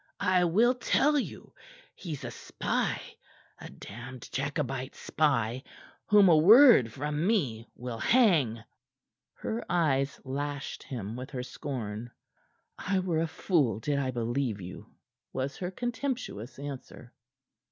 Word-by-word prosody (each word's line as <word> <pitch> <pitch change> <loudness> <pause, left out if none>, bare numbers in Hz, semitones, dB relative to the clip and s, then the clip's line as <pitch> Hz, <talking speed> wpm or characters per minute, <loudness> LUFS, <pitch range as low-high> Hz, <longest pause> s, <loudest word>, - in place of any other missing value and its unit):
"I 185 -1 +4
will 220 +9 +4
tell 290 +3 +2
you. - - -7 0.4
He's 155 -7 -7
a 120 - -5
spy - - -2 0.6
a - - -9
damned 120 +4 -10
Jacobite 135 -2 -3
spy, 130 -5 0 0.5
whom 205 -2 +6
a 170 - +7
word 205 - +8
from 150 +7 -2
me 130 - 0
will 120 -2 -6
hang." 155 - +3 0.7
Her 230 +2 -4
eyes 140 -5 +1
lashed 145 +1 -4
him 115 -6 -6
with 130 +2 -7
her 125 -3 -4
scorn. 120 -5 -5 0.7
"I 195 +1 0
were 180 -4 0
a 165 - 0
fool 145 - +1
did 140 +4 -1
I 135 -2 -1
believe 120 -2 -1
you," 90 -1 -9 0.5
was 135 +1 -3
her 180 - -3
contemptuous 240 - -4
answer. 135 -3 -8
140 Hz, 125 wpm, -29 LUFS, 120-180 Hz, 0.7 s, word